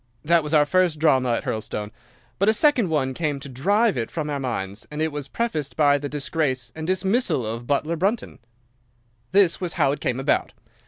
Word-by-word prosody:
That 170 +1 +4
was 150 +1 -1
our 150 -1 +5
first 180 0 +2
drama 130 -6 +3
at - - -1
Hurlstone; 105 -1 -4 0.5
but 200 +2 +4
a - - +5
second 245 - +3
one 135 -4 0
came 150 -2 -2
to 140 - -9
drive 200 - +1
it 115 -2 -2
from 150 -2 -4
our 140 - -2
minds, 105 -6 -4
and 150 - -6
it 160 0 0
was 145 -1 -5
prefaced 155 - -3
by 145 -2 +4
the 145 0 -5
disgrace 140 -4 -2
and 160 0 -5
dismissal 190 - +1
of 115 +2 -5
butler 150 +4 0
Brunton. 200 +8 -2 0.9
"'This 190 -2 +3
was 175 -3 -1
how 150 -6 +2
it 145 - -3
came 125 0 -1
about. 135 +2 0
150 Hz, 200 wpm, -23 LUFS, 130-175 Hz, 0.9 s, our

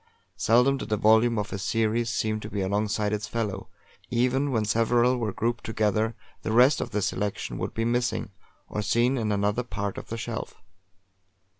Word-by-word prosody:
Seldom 125 +4 +3
did 125 - -7
a 105 - +2
volume 110 +2 +4
of 105 +1 -3
a 100 - -3
series 115 +3 0
seem 110 -1 -1
to 105 - -7
be 105 -2 -3
alongside 105 +2 0
its 105 0 -2
fellow; 105 -4 -3 0.4
even 130 +3 +1
when 110 -5 0
several 120 +3 +3
were 110 -3 -1
grouped 120 +4 -2
together, 110 +1 0 0.3
the - - -3
rest 125 +6 +5
of - - -3
the 105 -2 -1
selection 100 +2 -2
would - - -4
be 115 - 0
missing, 120 +1 0 0.4
or 105 - -3
seen 120 +5 +2
in 110 -4 -1
another 105 +3 +1
part 100 -5 -4
of - - -11
the 115 - -5
shelf. 115 0 -5
110 Hz, 180 wpm, -26 LUFS, 105-120 Hz, 0.4 s, rest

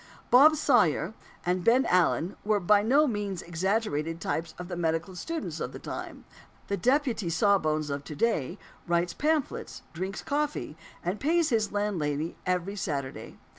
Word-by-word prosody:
Bob 295 +5 +8
Sawyer 235 - +2 0.3
and 180 0 0
Ben 245 +6 +4
Allen 180 0 +2
were 210 0 +2
by 205 +2 +4
no 275 +8 +4
means 205 - -2
exaggerated 170 -3 -1
types 165 0 -3
of 180 - -7
the 175 - -5
medical 165 +2 -1
students 325 - -4
of - - -4
the - - -6
time. - - -7 0.4
The 200 - +1
"deputy 250 - +1
sawbones" 155 -4 +2
of 140 0 -3
to 150 - -7
day 175 - 0 0.3
writes 170 0 +1
pamphlets, 305 -2 -1
drinks 190 +4 -4
coffee, 295 - -2 0.3
and 185 +4 -1
pays 330 +2 +2
his 220 -5 +1
landlady 165 -7 -1
every 185 +2 -1
Saturday. 140 -8 -4
190 Hz, 150 wpm, -28 LUFS, 165-230 Hz, 0.4 s, Bob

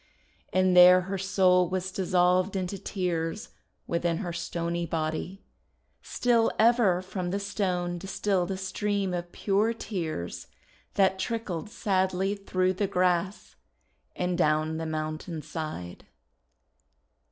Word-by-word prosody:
And 185 -1 +3
there 180 +1 +9
her 190 +1 -4
soul 185 -2 +3
was 185 0 -2
dissolved 185 0 +2
into 190 +1 -3
tears 175 -1 -3 0.4
within 170 0 0
her 175 -3 -4
stony 170 0 -3
body. 165 +4 -3 0.6
Still 235 -2 +2
ever 220 -6 +4
from 185 -1 -4
the 195 +3 -1
stone 180 -3 -2
distilled 195 0 -1
a 190 - -2
stream 195 0 -1
of 175 0 -4
pure 210 +3 +1
tears 160 - -4 0.5
that 190 -1 +3
trickled 210 -5 -3
sadly 190 -2 0
through 185 -2 0
the 200 +2 -1
grass 185 0 0 0.6
and 180 0 -1
down 155 0 +2
the 160 0 -3
mountain 155 +1 -4
side. 155 - -6
185 Hz, 120 wpm, -28 LUFS, 170-195 Hz, 0.6 s, there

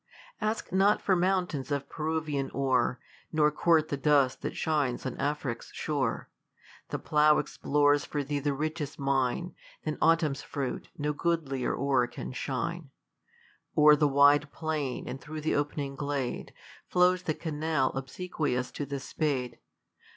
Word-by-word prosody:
Ask 215 +1 -2
net 195 +3 +4
for 190 - +2
mountains 180 -6 0
of 140 -1 -2
Peruvian 155 -3 -2
ore, 130 -2 +1 0.3
Nor 150 -1 +3
court 155 0 +3
the 140 - -1
dust 140 -2 +3
that - - -4
shines 145 -6 0
on 130 - -3
Afric's 140 -5 -3
shore. 140 -6 -2 0.6
The - - -2
plough 150 0 +4
explores 145 0 +2
for 145 -1 -3
thee 145 +1 -2
the 140 0 -1
richest 155 0 -3
mine; 135 +5 0 0.3
Than 155 -1 -2
autumn's 160 -4 +3
fruit, 140 -3 -4
no 150 0 -1
goodlier 145 -5 -1
ore 135 -3 +2
can - - -7
shine. 140 +5 -3 0.9
O'er 150 0 +8
the 150 0 +3
wide 145 +1 +5
plain 155 -5 -3
and 135 - -6
through 155 0 -6
the 155 - 0
opening 145 -1 -1
glade. 140 -3 -3 0.4
Flows 180 0 +3
the 160 -4 -2
canal 155 -3 0
obsequious 135 -2 -2
to 145 - -5
the 140 0 -3
spade. 135 -3 -2
145 Hz, 145 wpm, -29 LUFS, 135-155 Hz, 0.9 s, O'er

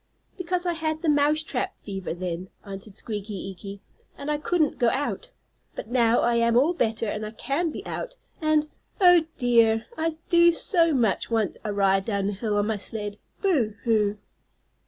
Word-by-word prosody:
"Because, 360 -1 -1
I 350 - +1
had 315 0 -3
the 320 - +2
mouse 295 +1 +3
trap 260 -4 -3
fever, 195 -3 -5
then," 180 0 -4 0.2
answered 195 0 -9
Squeaky 210 -1 -5
Eeky, 195 +1 -7 0.4
"and 280 +1 -3
I 295 - 0
couldn't 310 -1 0
go 240 - +4
out. 290 - -2 0.5
But - - -7
now 235 -1 +3
I 235 0 +2
am 235 0 +3
all 295 +8 +4
better 225 -8 0
and 210 0 -3
I 215 - -4
can 275 +9 -2
be - - -7
out, - - -5 0.2
and 310 -1 +2 0.3
oh, 355 -4 +6
dear! 230 -3 +3
I 325 0 -1
do 340 0 +6
so 335 -2 +3
much 225 -7 +1
want 220 -4 0
a 210 - -2
ride 195 -1 +2
down 200 -2 -1
hill 205 +1 -2
on 205 - +2
my 220 0 -1
sled. 205 +1 -5 0.2
Boo, 270 - +1
hoo!" 210 -3 +2
235 Hz, 180 wpm, -25 LUFS, 205-310 Hz, 0.5 s, oh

